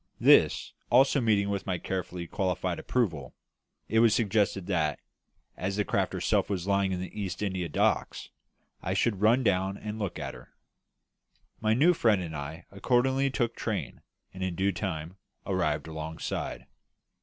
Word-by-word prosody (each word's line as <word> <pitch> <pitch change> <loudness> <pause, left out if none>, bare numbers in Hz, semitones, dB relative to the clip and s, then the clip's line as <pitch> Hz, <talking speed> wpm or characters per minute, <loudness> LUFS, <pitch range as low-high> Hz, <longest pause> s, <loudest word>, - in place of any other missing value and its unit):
This - - +5 0.2
also 135 +3 +5
meeting 105 -3 +2
with 100 -1 -3
my 90 -2 0
carefully 90 -1 -4
qualified 90 -1 -2
approval, 80 - -1 0.5
it 110 - +2
was 115 -1 +5
suggested 105 -4 +1
that, 80 -7 0 0.6
as 95 +2 -2
the 105 0 0
craft - - 0
herself - - +1
was 95 -3 -2
lying 100 -1 +2
in 90 - -2
the 95 +3 -6
East 95 +1 -3
India 95 -4 -2
Docks, - - 0 0.5
I 95 - -2
should 100 -1 +1
run 115 +5 +4
down 95 -2 +1
and 105 +1 -6
look 100 -5 -3
at - - -5
her. - - -15 1.0
My 110 0 +2
new 160 +8 +5
friend 110 - +3
and 85 -3 -5
I 75 +3 -6
accordingly 130 +6 +2
took 120 -3 -1
train, - - -4 0.3
and 95 - -9
in 95 -2 -2
due 95 +3 +1
time 90 -2 -4 0.3
arrived 85 -6 0
alongside. 80 0 -5
95 Hz, 155 wpm, -29 LUFS, 90-110 Hz, 1.0 s, This